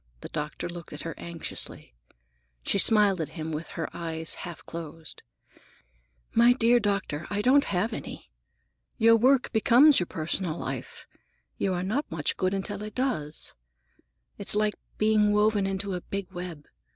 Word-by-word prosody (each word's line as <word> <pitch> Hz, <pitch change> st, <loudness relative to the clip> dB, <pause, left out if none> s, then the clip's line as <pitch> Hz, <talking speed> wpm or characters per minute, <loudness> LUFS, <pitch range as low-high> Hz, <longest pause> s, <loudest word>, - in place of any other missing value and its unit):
The -, -, -7 dB
doctor 150 Hz, +2 st, -4 dB
looked 170 Hz, -2 st, -9 dB
at 150 Hz, -, -6 dB
her 165 Hz, -, -4 dB
anxiously. 165 Hz, -, -7 dB, 0.7 s
She 200 Hz, -, +1 dB
smiled 205 Hz, -4 st, +5 dB
at 155 Hz, -, -3 dB
him 160 Hz, 0 st, -4 dB
with 155 Hz, +1 st, -4 dB
her 165 Hz, -, -1 dB
eyes 160 Hz, -1 st, -2 dB
half 175 Hz, -2 st, -8 dB
closed. 165 Hz, -2 st, -7 dB, 1.1 s
"My 235 Hz, +1 st, +6 dB
dear 240 Hz, 0 st, +4 dB
doctor, 200 Hz, -7 st, -1 dB
I 205 Hz, 0 st, -1 dB
don't 280 Hz, +4 st, +5 dB
have 200 Hz, +5 st, 0 dB
any. -, -, -7 dB, 0.7 s
Your 230 Hz, +1 st, +6 dB
work 255 Hz, +3 st, +3 dB
becomes 255 Hz, +6 st, +6 dB
your 180 Hz, -, -1 dB
personal 165 Hz, +1 st, -2 dB
life. 135 Hz, -5 st, -6 dB, 0.5 s
You 190 Hz, -2 st, +1 dB
are 175 Hz, -, -2 dB
not 240 Hz, +11 st, -1 dB
much 155 Hz, -3 st, -1 dB
good 185 Hz, +1 st, 0 dB
until 200 Hz, +1 st, -3 dB
it 215 Hz, 0 st, -7 dB
does. 230 Hz, -, -2 dB, 0.9 s
It's 200 Hz, -, +2 dB
like 210 Hz, 0 st, +2 dB, 0.2 s
being 215 Hz, -1 st, +3 dB
woven 210 Hz, -1 st, +3 dB
into 195 Hz, 0 st, -2 dB
a 180 Hz, -, -3 dB
big 195 Hz, +1 st, -5 dB
web. 175 Hz, -5 st, -7 dB
195 Hz, 155 wpm, -27 LUFS, 165-215 Hz, 1.1 s, My